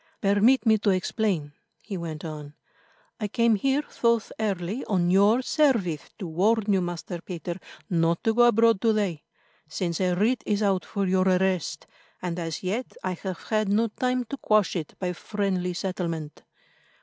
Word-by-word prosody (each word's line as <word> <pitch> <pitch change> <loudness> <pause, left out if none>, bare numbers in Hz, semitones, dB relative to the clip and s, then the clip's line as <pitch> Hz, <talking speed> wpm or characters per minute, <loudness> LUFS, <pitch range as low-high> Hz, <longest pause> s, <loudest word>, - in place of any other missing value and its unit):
"Permit 210 +7 +3
me 220 -1 +4
to 210 - +1
explain," 185 -4 0 0.3
he 200 - -7
went 165 -3 -5
on. 150 -2 -7 0.6
"I 210 - -1
came 230 +2 +2
here 270 +7 +1 0.2
thus 235 -2 +2
early 200 +2 -2
on 175 -4 +1
your 205 +6 +4
service, 230 - +1
to 205 - -6
warn 205 +5 +2
you, 190 - +3
Master 175 0 -5
Peter, 175 -1 -5 0.3
not 165 -1 +1
to 225 - +2
go 240 +1 +5
abroad 230 -3 +4
to 225 -1 +3
day, 195 -8 -1 0.5
since 170 +2 -2
a 180 -1 +2
writ 230 +6 +2
is 210 0 +1
out 195 -2 +1
for 200 -1 -2
your 185 0 +2
arrest, 185 -4 +1 0.3
and 175 -1 -3
as 165 0 -4
yet 215 +8 -3
I 185 - -1
have 185 0 -5
had 215 -2 +1
no 220 +3 +2
time 250 +3 -1
to 260 +4 -6
quash 215 -7 +2
it 160 -4 -4
by 180 -1 -2
friendly 185 -2 -2
settlement. 170 -5 -4
195 Hz, 170 wpm, -26 LUFS, 175-220 Hz, 0.6 s, go